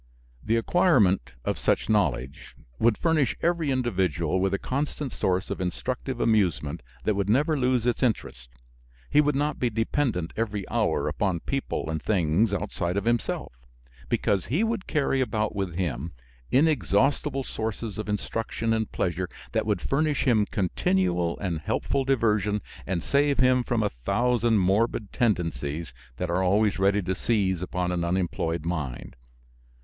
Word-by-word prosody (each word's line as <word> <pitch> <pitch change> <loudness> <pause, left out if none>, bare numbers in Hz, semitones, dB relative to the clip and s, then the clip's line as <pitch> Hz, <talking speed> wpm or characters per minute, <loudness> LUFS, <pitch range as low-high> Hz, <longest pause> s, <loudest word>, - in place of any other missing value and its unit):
The 110 - +1
acquirement 110 - +3
of - - -1
such - - +1
knowledge 90 - -1 0.2
would 115 -1 +3
furnish 160 -6 +2
every 170 -3 +1
individual 95 - 0
with 95 0 +1
a 100 - +1
constant 140 +3 -3
source 95 0 -1
of - - -3
instructive 125 +7 -3
amusement 90 -9 +1 0.2
that 110 - +2
would 100 0 -1
never 150 +8 +3
lose 125 -3 +1
its 120 - 0
interest. 80 - -1 0.6
He 150 - +6
would 150 -1 +1
not 145 +2 0
be 125 - +1
dependent 115 - -1
every 105 -3 -2
hour - - +1
upon 95 -5 -1
people 135 - -3
and 80 -1 -2
things 95 +2 +2
outside 90 -2 -2
of 100 - -1
himself; 120 - -1 0.6
because 95 -3 +1
he 160 - +1
would 225 -3 -2
carry 135 -3 +1
about 110 -4 -1
with 95 -4 -2
him 85 -4 -3 0.4
inexhaustible 135 - +2
sources 110 -2 -4
of 110 - -4
instruction 115 +2 -2
and 110 -1 -1
pleasure 90 0 -1 0.2
that - - 0
would - - 0
furnish 150 +1 +1
him 110 -6 +3
continual 90 -2 0
and 90 -5 -2
helpful 135 - -1
diversion 105 -6 +1 0.2
and 90 -3 -1
save 140 0 +2
him 130 -1 +4
from 120 -2 0
a 105 - 0
thousand 115 - +1
morbid 100 +3 +1
tendencies 80 - -1 0.2
that 90 -1 -2
are 90 +2 +1
always 100 +2 +2
ready 100 +1 +3
to 95 +1 -1
seize 95 -3 0
upon 90 -1 -2
an 90 -1 -1
unemployed 85 -2 -1
mind. 75 -8 -4
105 Hz, 150 wpm, -26 LUFS, 90-125 Hz, 0.6 s, He